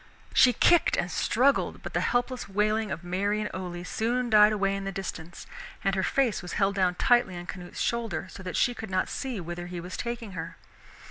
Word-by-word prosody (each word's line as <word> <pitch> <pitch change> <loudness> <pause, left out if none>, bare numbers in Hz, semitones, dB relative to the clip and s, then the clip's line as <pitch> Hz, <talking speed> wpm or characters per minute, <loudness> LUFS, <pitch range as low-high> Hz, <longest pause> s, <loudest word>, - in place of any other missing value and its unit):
She 250 - +7
kicked 345 +6 +4
and 175 +1 -1
struggled, 270 +5 +1
but - - -6
the - - +1
helpless 245 -2 -1
wailing 215 +2 +1
of 170 - -5
Mary 200 +4 0
and 210 - -3
Ole 175 -2 -5
soon 235 +5 -1
died 210 0 +7
away 195 -2 +1
in 195 - -4
the 195 - -3
distance, 175 -3 -6 0.4
and 195 -1 +1
her 190 - +1
face 245 +2 +1
was 180 -2 -7
held 195 -1 +2
down 185 -2 +1
tightly 240 -5 +3
on 175 - -7
Canute's 175 -1 -8
shoulder 225 -8 -1
so - - -10
that 185 -1 -5
she 245 - +3
could 220 -3 -7
not 185 -1 0
see 260 -6 -4
whither 175 0 -6
he 175 0 -6
was 180 +2 -7
taking 235 -3 -4
her. 180 - -6
195 Hz, 210 wpm, -27 LUFS, 180-235 Hz, 0.4 s, She